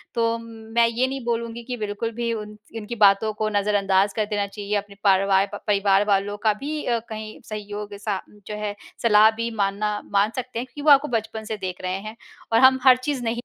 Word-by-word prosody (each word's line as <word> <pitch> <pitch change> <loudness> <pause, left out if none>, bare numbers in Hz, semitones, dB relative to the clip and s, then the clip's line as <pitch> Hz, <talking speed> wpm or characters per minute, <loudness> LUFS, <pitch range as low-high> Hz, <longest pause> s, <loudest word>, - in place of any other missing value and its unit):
तो 230 0 +1
मैं 230 0 0
ये 240 +3 0
नहीं 270 -1 -5
बोलूँगी 235 0 -3
कि 250 +1 -5
बिल्कुल 210 +1 -3
भी 235 0 0
उन 210 -1 -7 0.2
उनकी 220 +2 -6
बातों 210 0 +4
को 215 - +1
नज़रअंदाज 200 -1 +2
कर 215 - 0
देना 205 -1 -1
चाहिए। 205 0 -4
अपने 200 0 -6
पारवार 195 0 +4 0.2
परिवार 200 -1 +3
वालों 205 0 +1
का 215 - +5
भी 300 +2 -4 0.2
कहीं 215 0 -7
सहयोग 210 -1 -6
सा 200 -1 -3 0.3
जो 210 - -4
है, 210 -1 -3 0.3
सलाह 215 -1 +7
भी 230 - -1
मानना 205 +1 -1
मान 205 +2 +3
सकते 250 -2 -4
हैं 250 - -3
क्योंकि 290 +3 -10
वो 300 - +5
आपको 280 +1 +6
बचपन 220 0 -6
से 220 0 -4
देख 185 -2 -5
रहे 185 0 -2
हैं, 215 +2 -8 0.4
और 225 - +5
हम 260 0 +6
हर 260 -1 +7
चीज़ 255 0 -3
नहीं 235 0 -1
215 Hz, 205 wpm, -23 LUFS, 205-230 Hz, 0.4 s, सलाह